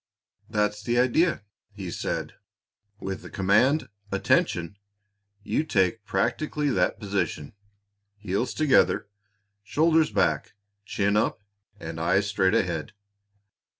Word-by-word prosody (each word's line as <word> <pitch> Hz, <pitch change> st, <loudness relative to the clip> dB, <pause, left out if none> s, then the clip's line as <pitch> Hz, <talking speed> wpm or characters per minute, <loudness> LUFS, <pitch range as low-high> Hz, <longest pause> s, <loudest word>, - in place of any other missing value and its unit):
"That's 105 Hz, 0 st, 0 dB
the 120 Hz, +3 st, -1 dB
idea!" 130 Hz, -, +2 dB, 0.3 s
he 95 Hz, -4 st, -6 dB
said. -, -, -3 dB, 0.7 s
"With 95 Hz, 0 st, -5 dB
the -, -, -10 dB
command 115 Hz, +10 st, +2 dB, 0.2 s
'Attention!' 85 Hz, +3 st, +1 dB, 0.7 s
you 150 Hz, -, 0 dB
take 115 Hz, -, 0 dB
practically 145 Hz, +8 st, 0 dB
that -, -, +1 dB
position, 95 Hz, -7 st, -3 dB, 0.6 s
heels 100 Hz, +4 st, -2 dB
together, 150 Hz, -8 st, +3 dB, 0.5 s
shoulders 160 Hz, +8 st, +2 dB
back, -, -, 0 dB, 0.3 s
chin 100 Hz, 0 st, 0 dB
up, 105 Hz, -1 st, 0 dB, 0.4 s
and 80 Hz, -3 st, -6 dB
eyes 85 Hz, +5 st, +2 dB
straight 100 Hz, -2 st, +2 dB
ahead. 80 Hz, -3 st, -1 dB
105 Hz, 105 wpm, -26 LUFS, 95-125 Hz, 0.7 s, together